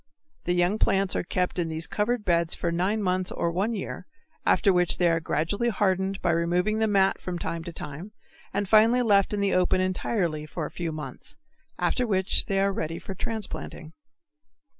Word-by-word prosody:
The 175 - +1
young 180 +5 +2
plants 195 -1 +2
are - - +1
kept 180 +1 -2
in 165 -2 -1
these 160 +1 -2
covered 215 +1 -1
beds 170 -1 +2
for 170 - -2
nine 190 +5 0
months 185 -1 0
or 170 - -1
one 200 +7 -1
year, 195 - -6 0.4
after 200 -4 +4
which 180 -1 +2
they 175 - +3
are 165 - +2
gradually 165 +9 -1
hardened 190 -2 0
by - - +3
removing 175 +6 +1
the 220 - +2
mat 195 -2 +2
from 180 -1 -4
time 170 -1 -4
to 170 - -5
time, 160 +5 -8 0.4
and 200 +1 -1
finally 225 +4 +5
left 200 -4 +3
in 205 -1 -1
the 200 -1 +1
open 185 0 +2
entirely 180 -4 -1
for 160 0 -4
a - - -7
few 170 -2 -4
months, 155 - -7 0.4
after 250 -2 0
which 190 -3 +1
they 195 -1 +1
are 195 0 +2
ready 165 -2 -3
for 195 - -7
transplanting. 190 -6 -5
185 Hz, 190 wpm, -26 LUFS, 170-205 Hz, 0.4 s, finally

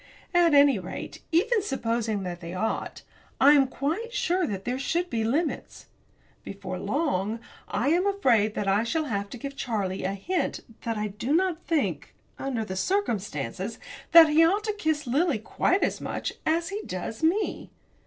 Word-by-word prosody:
At 345 -3 +5
any 280 -6 +6
rate, 185 0 -7
even 430 +7 +3
supposing 230 - -1
that 175 -1 -5
they 170 +1 -6
ought 220 +4 -3 0.4
I 280 +2 +7
am 275 -2 +5
quite 325 - -3
sure 365 -6 0
that 195 -3 -5
there 250 +2 -2
should 345 +5 -1
be 225 -1 0
limits. 295 +9 -2 0.6
Before - - -6
long 230 - -1 0.3
I 220 +7 0
am 355 +5 +3
afraid 235 - +2
that 205 - -2
I 200 +3 +3
shall 315 +7 -1
have 200 -6 -3
to 245 - -8
give 275 +3 -6
Charlie 200 -8 -2
a 195 +1 -1
hint 330 - -2 0.2
that 230 -1 -1
I 210 0 -2
do 230 +9 -1
not 355 -1 +1
think, 320 -4 -1 0.2
under 250 -5 -2
the 190 - -5
circumstances, 200 - -2 0.3
that 330 -2 +9
he 310 +2 +5
ought 390 +6 +3
to 425 -1 -1
kiss 315 -7 -1
Lily 280 +3 +1
quite 350 - 0
as - - -1
much - - -3
as 335 +1 +1
he 410 +2 -4
does 185 +4 -5
me. 360 +7 0
270 Hz, 175 wpm, -27 LUFS, 210-335 Hz, 0.6 s, that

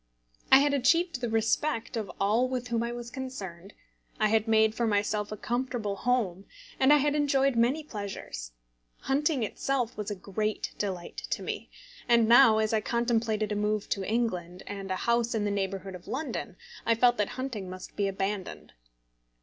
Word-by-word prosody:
I 265 - +11
had 285 +1 +3
achieved 285 +2 +2
the 240 - -1
respect 225 +4 0
of 220 -3 -3
all 220 +6 +2
with 250 -1 -3
whom 230 -1 0
I 235 0 -2
was 240 0 -7
concerned, 205 -9 -7 0.5
I 215 - +3
had 220 +1 +2
made 220 -1 +4
for 235 +1 0
myself 210 0 0
a 215 - -4
comfortable 240 -3 -2
home, 200 -5 0 0.3
and 265 +2 +5
I 295 - +8
had 290 0 +2
enjoyed 275 -3 +2
many 250 +7 +2
pleasures. 195 - -6 0.5
Hunting 275 0 +1
itself 250 +2 -1
was 210 0 -4
a 205 - -3
great 210 +3 -3
delight 185 -4 -4
to - - -2
me; - - -5 0.4
and 235 -2 +5
now, 235 -1 +7
as 220 0 +1
I 220 - +2
contemplated 225 -2 0
a - - 0
move 210 0 -1
to 195 - -1
England, 185 -5 -2
and 195 -1 -6
a 185 - 0
house 235 0 +2
in 210 -2 0
the 205 - 0
neighbourhood 195 -1 -3
of 180 -1 -11
London, 235 - -4 0.3
I 230 - +3
felt 240 +1 +4
that 210 -1 0
hunting 240 -8 -4
must 185 0 -9
be 200 -1 +1
abandoned. 195 0 -4
220 Hz, 180 wpm, -29 LUFS, 200-250 Hz, 0.5 s, I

